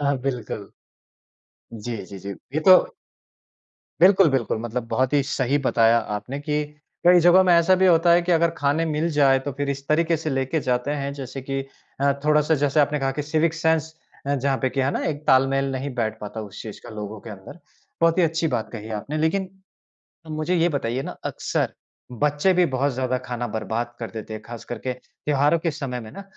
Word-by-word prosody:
हाँ 140 -1 +1
बिल्कुल। 125 -5 -4 1.0
जी, 115 +1 -5
जी, 100 - -10
जी, 100 - -7 0.2
ये 155 - +1
तो 185 -1 +10 1.2
बिल्कुल-बिल्कुल 165 - +4
मतलब 120 0 -4
बहुत 130 +3 0
ही 145 -1 +3
सही 135 0 0
बताया 115 -1 +4 0.2
आपने 125 +7 -6
कि, 150 0 -1 0.4
कई 180 0 +7
जगहों 175 +2 +6
में 180 - +4
ऐसा 170 +2 +5
भी 190 - +6
होता 170 0 +5
है 175 0 +5
कि 180 - +1
अगर 170 0 +3
खाने 145 +3 +1
मिल 155 +2 0
जाए 140 -3 +4
तो 140 +1 -4
फिर 145 0 -1
इस 140 0 -5
तरीके 165 +2 +2
से 155 0 -4
लेके 135 +3 -1
जाते 125 +1 -1
हैं 140 -1 -2
जैसे 135 -1 -7
कि 135 +1 -3 0.4
अ, 140 0 +3
थोड़ा-सा 150 +1 +3
जैसे 145 +1 +2
आपने 145 +1 +1
कहा 135 0 +1
कि 150 - 0
सिविक 155 +2 +1
सेंस 160 -1 0 0.3
अ, 140 - +1
जहाँ 135 0 0
पे 130 - +3
की, 135 - -1
है 130 +1 +1
ना? - - -2
एक 150 0 -3
तालमेल 135 0 +3
नहीं 130 +1 -4
बैठ 110 -2 -2
पाता 105 +1 -6
उस 105 -3 -8
चीज़ 110 -2 -9
का - - -9
लोगों 105 0 -6
के 115 - -10
अंदर। 100 - -11 0.4
बहुत 165 +1 +3
ही 180 - +5
अच्छी 165 0 +1
बात 115 -2 -2
कही 110 -1 -7
आपने। 150 +7 -4
लेकिन, 185 +5 0 0.8
मुझे 155 +3 -1
ये 170 0 +3
बताइए 130 -4 -2
ना - - -5
अक्सर - - -2 0.5
बच्चे 150 +5 +3
भी 180 0 +4
बहुत 140 +2 +1
ज़्यादा 130 0 -1
खाना 120 -1 -3
बर्बाद 110 +2 -3
कर 115 - -5
देते 110 -1 -7
हैं 110 - -6
खास 120 -1 -9
करके 120 +2 -4
त्योहारों 145 +4 0
के 165 0 -1
समय 135 -5 -4
में 110 -1 -10
ना, 200 - -9
140 Hz, 205 wpm, -23 LUFS, 125-160 Hz, 1.2 s, तो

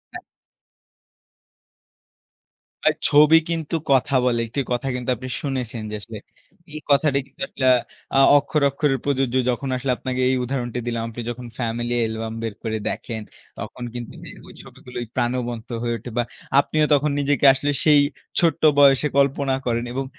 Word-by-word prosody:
অ্যা - - -5 2.6
ভাই - - +4
ছবি 150 +2 +6
কিন্তু 165 -1 -2 0.2
কথা 135 +1 +3
বলে। 120 -2 +2
একটি 140 +5 -2
কথা 125 +2 -1
কিন্তু 125 +1 -4
আপনি 130 +2 -8
শুনেছেন। 125 -4 -3
যে 105 - -3
আসলে, 110 +1 -9 0.6
এই 155 - -5
কথাটা 140 0 +3
কিন্তু - - -20
আসলে 130 - -3
আ - - +5 0.4
আ - - +6 0.2
অক্ষরে, 145 0 +1
অক্ষরে 140 -1 +1
প্রযোজ্য। 135 -3 0 0.2
যখন 130 +3 -4
আসলে 130 +1 -1
আপনাকে 130 -1 -3
এই 130 - +2
উদাহরণটা 125 -1 -3
দিলাম। 115 -1 -2
আপনি 120 +1 -7
যখন 120 0 -6
ফ্যামিলি 120 0 -2
অ্যালবাম 110 0 -3
বের 115 -2 -3
করে 110 -1 -2
দেখেন। 110 -2 -5 0.4
তখন 110 +4 -7
কিন্তু 120 -1 -7 0.3
ওই - - -12
ছবিগুলোই 120 -1 -8
প্রাণবন্ত 120 -1 -2
হয়ে 120 -1 -1
ওঠে 120 +2 -9
বা 120 - +3 0.4
আপনিও 155 +1 +2
তখন 145 +1 +2
নিজেকে 145 -1 +1
আসলে 145 +2 -1
সেই, 150 -2 +6 0.4
ছোট্ট 165 -4 +2 0.2
বয়সে 140 0 +5
কল্পনা 140 -1 +2
করেন। 120 0 0
এবং 135 +1 -2
130 Hz, 160 wpm, -22 LUFS, 120-140 Hz, 2.6 s, ছবি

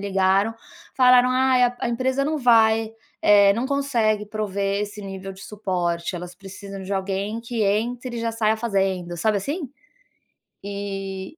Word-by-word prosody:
ligaram 195 +2 +1 0.4
falaram: 250 -1 +5
"Ai, 255 0 +3
a 245 0 0
a - - -1
empresa 260 +3 0
não 310 +2 -1
vai, 225 -3 +4 0.3
eh, 200 -1 +6
não 235 +4 -1
consegue 235 -7 0
prover 200 -1 -2
esse 210 0 -6
nível 195 0 -7
de 190 - -13
suporte, 180 -4 -2
elas 180 +1 -8
precisam 195 +1 -9
de 190 +1 -5
alguém 195 +3 -2
que 230 -1 -3
entre 240 +5 -1
e - - -3
já 230 0 -2
saia 220 -1 +1
fazendo", 190 -6 -1
sabe 210 +4 +1
assim? 285 - -4 0.9
E 195 +3 -6
210 Hz, 155 wpm, -23 LUFS, 195-240 Hz, 0.9 s, eh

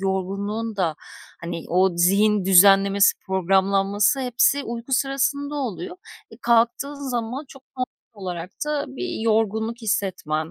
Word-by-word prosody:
yorgunluğun 200 +3 -3
da, 170 -5 0 0.5
hani, 170 -1 -6
o 185 0 +2
zihin 200 +3 +3
düzenlemesi, 195 +1 +5
programlanması 195 - +2
hepsi 255 +3 +2
uyku 235 +3 -6
sırasında 280 +2 0
oluyor. 190 - -4 0.3
E, 225 - -13
kalktığın 245 +4 0
zaman 245 +4 -3
çok 270 -1 -14
normal 255 0 -1 0.4
olarak 180 -1 -5 0.2
da 300 -1 -1
bir 335 +5 -5
yorgunluk 220 0 0
hissetmen, 175 -7 -2
210 Hz, 120 wpm, -23 LUFS, 190-250 Hz, 0.5 s, düzenlemesi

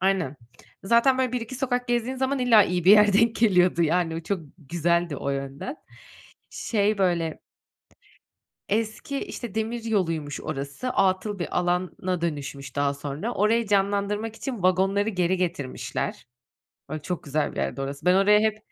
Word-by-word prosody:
Aynen. 185 -7 0 0.5
Zaten 235 +5 +4
böyle 255 -2 +1
1-2 245 0 -4
sokak 250 -1 -1
gezdiğin 240 +2 0
zaman 265 +1 0
illa 240 -4 +6
iyi 180 -1 -2
bir 190 - +7
yer 210 0 +7
denk 225 +3 +3
geliyordu. 180 -6 +3
Yani, 165 0 +1
o - - -3
çok 190 +2 -2 0.2
güzeldi 170 +1 0
o 140 - -3
yönden. 140 - -5 0.7
Şey, 210 -1 0
böyle 170 -4 0 1.3
eski, 225 +6 -2
işte, 235 -5 -7
demir 225 +1 -2
yoluymuş 165 -9 -1
orası. 145 - -4
Atıl 195 -1 +1
bir 175 - -2
alana 180 0 -1
dönüşmüş 145 -4 -4
daha 140 0 +1
sonra, 145 +10 -4
orayı 225 +3 +2
canlandırmak 205 +2 0
için 240 -6 -5
vagonları 195 +3 +2
geri 185 -2 0
getirmişler. 155 -12 -3 0.6
Böyle, 155 0 -5
çok 180 0 -4
güzel 145 +1 -1
bir - - -14
yerdi 70 - -2
orası. 140 +4 -6
Ben 180 - +6
oraya 205 +2 +5
hep 215 0 +1
190 Hz, 150 wpm, -25 LUFS, 165-220 Hz, 1.3 s, bir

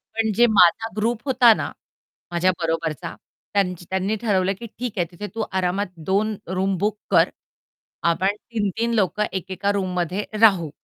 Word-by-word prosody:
पण 220 -1 +1
जे 240 +3 +6
माझा 205 +2 +5
ग्रुप 225 +2 0
होता 250 -4 +6
ना, - - -4 0.6
माझ्या 175 +2 +2
बरोबरचा 165 0 -2 0.4
त्यांची 180 -3 0
त्यांनी 190 +3 0
ठरवलं, 195 -3 +1
की 235 - -7
ठीक 245 -3 -3
आहे 175 -2 +1
तिथे 205 +4 -7
तू 225 - -1
आरामात 190 +1 0 0.2
2 210 +3 +1
रूम 190 +2 0
बुक 210 +3 -1
कर. - - +5 0.7
आपण 180 +4 +2
3-3 225 +1 -2
लोकं 210 0 +1
एकेका 190 +1 -2
रूममध्ये 185 0 -2 0.2
राहू 190 -8 +5
195 Hz, 150 wpm, -23 LUFS, 180-215 Hz, 0.7 s, जे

